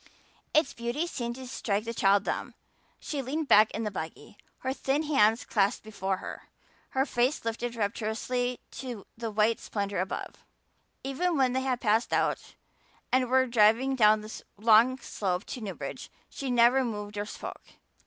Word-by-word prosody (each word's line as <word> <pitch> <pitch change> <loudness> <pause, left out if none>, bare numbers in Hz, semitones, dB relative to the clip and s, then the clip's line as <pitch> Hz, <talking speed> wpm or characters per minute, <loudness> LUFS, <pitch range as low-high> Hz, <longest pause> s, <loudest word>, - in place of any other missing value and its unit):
Its 310 +1 +3
beauty 240 +7 -2
seemed 240 -8 -4
to 260 0 -8
strike 215 -5 -2
the 230 +1 -4
child 200 -2 +3
dumb. - - -3 0.4
She 290 -2 -3
leaned 290 +4 -3
back 215 +1 +7
in 225 - -4
the 210 - -2
buggy, 160 +2 -7 0.3
her 260 0 -1
thin 275 +3 0
hands 225 -7 +3
clasped 205 +1 +1
before 195 -3 -2
her, - - -9 0.5
her 265 - +4
face 250 0 0
lifted 235 +1 -3
rapturously 230 +4 -2
to 245 -6 -7
the 230 0 -4
white 215 +1 +2
splendor 200 -2 -3
above. 185 +1 -4 0.7
Even 325 +5 0
when 260 -2 +3
they 260 - +1
had 255 -2 -1
passed 220 +1 +2
out - - 0 0.6
and 255 -1 +2
were 260 0 +4
driving 235 +3 +4
down 215 -3 +5
the 215 +1 -9
long 225 +4 +5
slope 190 -6 -2
to 250 - -6
Newbridge 205 -3 -6 0.2
she 275 - -5
never 245 +2 +5
moved 210 -3 -5
or 205 0 -3
spoke. - - -7
235 Hz, 165 wpm, -29 LUFS, 210-260 Hz, 0.7 s, back